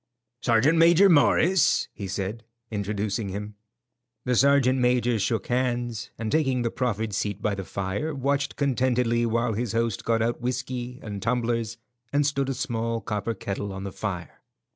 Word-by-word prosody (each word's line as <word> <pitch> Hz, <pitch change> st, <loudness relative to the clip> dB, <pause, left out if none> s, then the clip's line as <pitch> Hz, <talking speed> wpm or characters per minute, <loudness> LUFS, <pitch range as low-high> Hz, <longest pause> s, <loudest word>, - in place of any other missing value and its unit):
"Sergeant 130 Hz, +8 st, +3 dB
Major 170 Hz, +4 st, +6 dB
Morris," 165 Hz, 0 st, +4 dB
he 100 Hz, -, -6 dB
said, 100 Hz, +4 st, -4 dB, 0.3 s
introducing 105 Hz, 0 st, -2 dB
him. 105 Hz, +2 st, -5 dB, 0.7 s
The 125 Hz, -, +1 dB
sergeant 135 Hz, 0 st, +4 dB
major 125 Hz, -2 st, +2 dB
shook 105 Hz, +2 st, 0 dB
hands, 120 Hz, -2 st, -1 dB
and 110 Hz, -1 st, -3 dB
taking 135 Hz, -5 st, +2 dB
the 115 Hz, -, -1 dB
proffered 110 Hz, -4 st, -2 dB
seat 105 Hz, 0 st, -2 dB
by 105 Hz, 0 st, 0 dB
the 95 Hz, -1 st, -4 dB
fire, 100 Hz, -, -3 dB
watched 140 Hz, +1 st, 0 dB
contentedly 125 Hz, -3 st, +1 dB
while 115 Hz, 0 st, 0 dB
his 115 Hz, +1 st, -2 dB
host 115 Hz, -3 st, 0 dB
got 115 Hz, -1 st, +1 dB
out 120 Hz, +1 st, -1 dB
whiskey 125 Hz, 0 st, -3 dB
and 105 Hz, -2 st, -6 dB
tumblers 115 Hz, -1 st, -1 dB, 0.3 s
and 145 Hz, 0 st, +2 dB
stood 140 Hz, -1 st, 0 dB
a 135 Hz, -, -1 dB
small 115 Hz, -3 st, -2 dB
copper 105 Hz, +1 st, -3 dB
kettle 100 Hz, +1 st, -4 dB
on 95 Hz, 0 st, -6 dB
the 100 Hz, -, -5 dB
fire. 90 Hz, -5 st, -5 dB
115 Hz, 160 wpm, -26 LUFS, 105-130 Hz, 0.7 s, Major